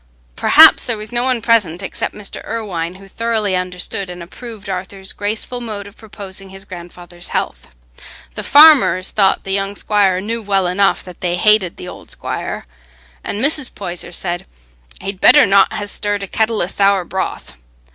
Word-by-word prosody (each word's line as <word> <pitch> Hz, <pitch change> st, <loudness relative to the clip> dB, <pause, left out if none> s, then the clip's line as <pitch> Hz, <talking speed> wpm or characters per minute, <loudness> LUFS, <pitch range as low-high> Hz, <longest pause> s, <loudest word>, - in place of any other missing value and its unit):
Perhaps -, -, +7 dB
there 230 Hz, -3 st, -2 dB
was 215 Hz, +1 st, -6 dB
no 240 Hz, +1 st, 0 dB
one 250 Hz, -3 st, 0 dB
present 205 Hz, -7 st, +2 dB
except -, -, -4 dB
Mr. 210 Hz, -2 st, -7 dB
Irwine 185 Hz, -7 st, -4 dB
who 195 Hz, +1 st, -14 dB
thoroughly 220 Hz, -2 st, -1 dB
understood 180 Hz, +1 st, -3 dB
and 175 Hz, -1 st, -8 dB
approved 215 Hz, +3 st, -10 dB
Arthur's 190 Hz, 0 st, -5 dB
graceful 220 Hz, +4 st, -4 dB
mode 210 Hz, -4 st, -6 dB
of 200 Hz, +1 st, -13 dB
proposing 195 Hz, -3 st, -8 dB
his 195 Hz, +1 st, -9 dB
grandfather's 175 Hz, -1 st, -8 dB
health. -, -, -3 dB, 0.7 s
The -, -, -5 dB
farmers 290 Hz, -11 st, +6 dB
thought 195 Hz, -2 st, +2 dB
the 195 Hz, -, -5 dB
young 195 Hz, +1 st, -2 dB
squire 200 Hz, -3 st, +1 dB
knew 225 Hz, +4 st, -4 dB
well 195 Hz, -3 st, 0 dB
enough 195 Hz, +2 st, +1 dB
that 180 Hz, -2 st, -13 dB
they 175 Hz, -1 st, 0 dB
hated 205 Hz, -2 st, +2 dB
the 180 Hz, -, -8 dB
old -, -, -11 dB
squire, -, -, -5 dB, 0.6 s
and 215 Hz, +6 st, -1 dB
Mrs. 295 Hz, -2 st, 0 dB
Poyser 175 Hz, -3 st, -4 dB
said, 175 Hz, -1 st, -3 dB, 0.5 s
"he'd 195 Hz, -1 st, -6 dB
better -, -, +7 dB
not 195 Hz, -1 st, +4 dB
ha' 205 Hz, -, -3 dB
stirred 205 Hz, 0 st, -3 dB
a -, -, -5 dB
kettle 220 Hz, +1 st, 0 dB
o' -, -, +1 dB
sour 195 Hz, 0 st, +1 dB
broth." 190 Hz, +2 st, -4 dB
195 Hz, 170 wpm, -17 LUFS, 185-215 Hz, 0.7 s, Perhaps